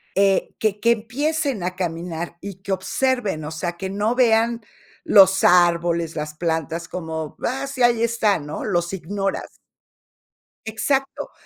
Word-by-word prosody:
eh, 195 0 +2
que 210 -2 0
que 235 +2 +3
empiecen 270 - -1
a 180 +1 -2
caminar, 170 -1 -4
y 195 -1 -9
que 195 - -6
observen, 195 -1 -1
o 150 - -5
sea, 175 +2 -3
que 190 +2 -5
no 205 +4 0
vean 235 -1 +3 0.4
los 190 -1 +6
árboles, 170 -2 +3
las 150 -1 -4
plantas, 165 0 -2
como: 160 -3 -5
"Ah, 270 +3 -2
sí, 260 -2 -2
ahí 240 -1 +4
están", 220 -8 +1
¿no? 150 - -5
Los 175 -3 -1
ignoras. 195 +2 -4 1.0
Exacto. 270 +5 -2
195 Hz, 140 wpm, -22 LUFS, 170-230 Hz, 1.0 s, los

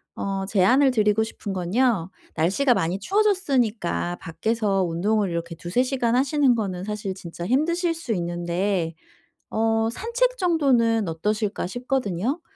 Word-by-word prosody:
어 195 -1 -3
제안을 245 +8 +4
드리고 215 -2 +2
싶은 210 -2 -6
건요 190 0 +1 0.2
날씨가 200 - +2
많이 175 +2 -1
추워졌으니까 255 - 0
밖에서 200 +2 0
운동을 195 +4 0
이렇게 170 0 -4
2-3 175 +9 -1
시간 250 -3 0
하시는 270 -1 +3
거는 190 -5 -3
사실 210 -2 -4
진짜 175 -1 -7
힘드실 335 +6 +1
수 320 -8 -5
있는데 175 -1 -1 0.6
어 225 0 +1
'산책 - - 0
정도는 250 - +2
어떠실까.' 210 +5 -2
싶거든요. 245 - -2
215 Hz, 300 characters per minute, -24 LUFS, 185-260 Hz, 0.6 s, 제안을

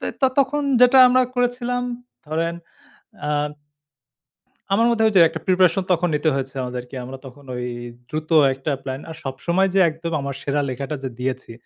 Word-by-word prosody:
তে - - -3
ত - - -28 0.2
তখন 290 +2 0 0.2
যেটা 250 +1 +7
আমরা 255 +1 +4
করেছিলাম 245 0 0 0.4
ধরেন 165 +2 -1 0.7
আ - - -2 1.5
আমার 230 +3 +4
মধ্যে 225 -1 +2
ওইযে, 195 -5 +5
একটা 160 - -7
প্রিপারেশন 185 0 +3
তখন 175 0 +2
নিতে 155 +1 +1
হয়েছে 135 0 -4
আমাদেরকে 125 +1 -6
আমরা 130 +2 -8
তখন 135 +2 -13
ওই 125 0 -4 0.4
দ্রুত 155 +1 -4 0.2
একটা 135 +3 -4
প্ল্যান, 130 0 -5
আর 160 - -7
সবসময় 170 +8 0
যে, 195 - +5
একদম 165 +1 -6
আমার 140 -1 -4
সেরা 145 +1 0
লেখাটা 135 +4 -4
যে 130 - -2
দিয়েছি, 130 -2 -3
160 Hz, 165 wpm, -22 LUFS, 135-195 Hz, 1.5 s, যেটা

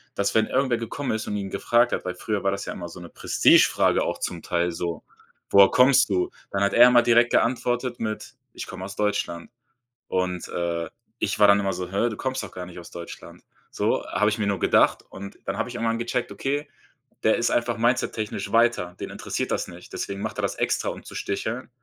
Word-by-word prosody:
dass, 100 - 0
wenn 110 0 +3
irgendwer 130 -3 +1
gekommen 115 +5 -4
ist 110 0 -3
und 105 - -2
ihn 95 -1 -5
gefragt 120 +4 +2
hat - - -2
weil 90 0 -4
früher 105 +2 -2
war 100 - +2
das 100 0 -4
ja - - -4
immer 85 -1 -7
so 90 - -11
'ne 85 - -10
Prestigefrage - - +4
auch 85 0 -1
zum 85 -2 -4
Teil 85 0 0
so: 85 -1 -4 0.5
„Woher 100 0 +8
kommst 130 -1 +5
du?“ 90 -2 0 0.2
Dann 100 0 -1
hat 100 - +1
er 120 +1 +8
immer 120 -1 +5
direkt 120 0 +4
geantwortet 120 0 0
mit: 110 -1 -4 0.2
„Ich - - -6
komme 95 - -7
aus 100 - -8
Deutschland.“ 105 -4 -2 0.6
und, 90 -1 -1
äh, 85 -1 -2 0.3
ich - - -1
war 105 - +7
dann 100 0 +6
immer 95 -1 -1
so: 90 -1 -5
„Hä, 100 +5 +1
du 110 - -6
kommst 130 -2 -3
doch 105 - -8
gar 90 - -6
nicht 90 - -11
aus 85 - -11
Deutschland.“ 85 -1 -10 0.3
So, - - -1
habe 105 +1 +1
ich 105 - -3
mir 105 - 0
nur 100 -1 0
gedacht - - +3
und 100 +1 -9
dann 95 - -3
habe - - -1
ich 125 - -8
irgendwann 115 -1 -1
gecheckt: 120 +1 -2
„Okay, 145 +2 -2 0.6
der - - +4
ist - - +1
einfach 120 -1 0
mindsettechnisch 110 -4 -1
weiter, 115 -7 +2
den - - -5
interessiert - - -4
das - - -1
nicht. - - -13
Deswegen 100 0 -4
macht - - -4
er - - +1
das - - -1
extra, - - 0
um - - -7
zu - - -10
sticheln, 110 +6 -3
105 Hz, 225 wpm, -24 LUFS, 90-120 Hz, 0.6 s, Woher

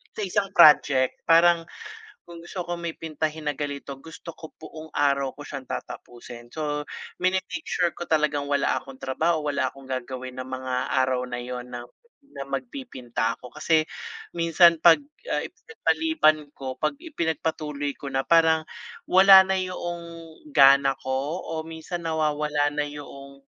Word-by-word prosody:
Sa - - -4
isang 195 +1 0
project 140 -3 +6
parang 170 0 +5 0.7
kung 170 -1 -10
gusto 180 +1 -6
ko 175 0 -4
may 170 -1 -4
pintahin 155 -1 -3
na - - +1
ganito, 140 -1 -5
gusto 165 +2 -10
ko 160 - -11
buong 160 0 -10
araw 140 -2 +1
ko 145 - -9
siyang 135 -2 -7
tatapusin. 120 0 -8
So, 150 -1 -3 0.3
mini-make 185 -1 -1
sure 175 -1 +1
ko 175 - -5
talagang 150 -2 +1
wala 140 -1 +1
akong 135 - -12
trabaho, 160 +4 0
wala 140 -2 0
akong 135 0 -14
gagawin 130 0 -5
ng 130 - -5
mga 130 0 -4 0.3
araw 130 -1 0
na 120 -1 -5
yun 125 0 -6
na 120 - -5 0.4
na 140 - -9
magpipinta 130 -3 -3
ako. 125 - -12
Kasi 160 -1 +3 0.6
minsan 170 0 +5
'pag, 170 - +7 0.3
ah, - - 0
ipinagpaliban 320 - +1 0.2
ko, 130 -1 -6
'pag 155 - 0
ipinagpatuloy 160 - -3
ko 140 - -6
na 135 - +1
parang 160 -1 +4 0.5
wala 190 +1 +9
na 190 0 0
'yong 175 -2 -4 0.5
gana 135 0 +6
ko 135 +6 -2 0.2
o - - -1
minsan 165 +1 -6
nawawala 150 -2 0
na 145 0 -1
'yong 140 -1 -10
150 Hz, 150 wpm, -25 LUFS, 135-170 Hz, 0.7 s, wala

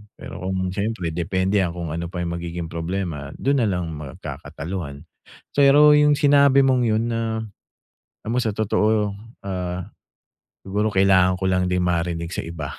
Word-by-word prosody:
Pero - - -9
kung 95 0 -2
siyempre 100 -2 -2
depende 95 +4 0
kung 85 -2 -5
ano 85 +2 -3
pa 90 +1 -5
'yung 85 - -3
magiging 85 -1 -5
problema 85 -4 -4
dun 140 +1 +1
nalang 90 -7 -1
magkakataluhan. 75 +1 -7 0.5
Pero 145 +1 +6
'yung 150 0 +5
sinabi 140 -1 +5
mong 130 -2 +3
'yun 110 0 +1
na, 115 -1 -2 0.8
alam 110 - -4
mo 125 - +1
sa 110 -4 -1
totoo, 105 -1 +1 0.3
ah, 90 0 -4 0.7
siguro 105 +3 0
kailangan 95 -1 +4
ko 95 - -5
lang 90 0 +1
din 90 0 0
marinig 85 -1 -1
sa - - -2
iba 80 -4 -6
95 Hz, 150 wpm, -22 LUFS, 85-110 Hz, 0.8 s, Pero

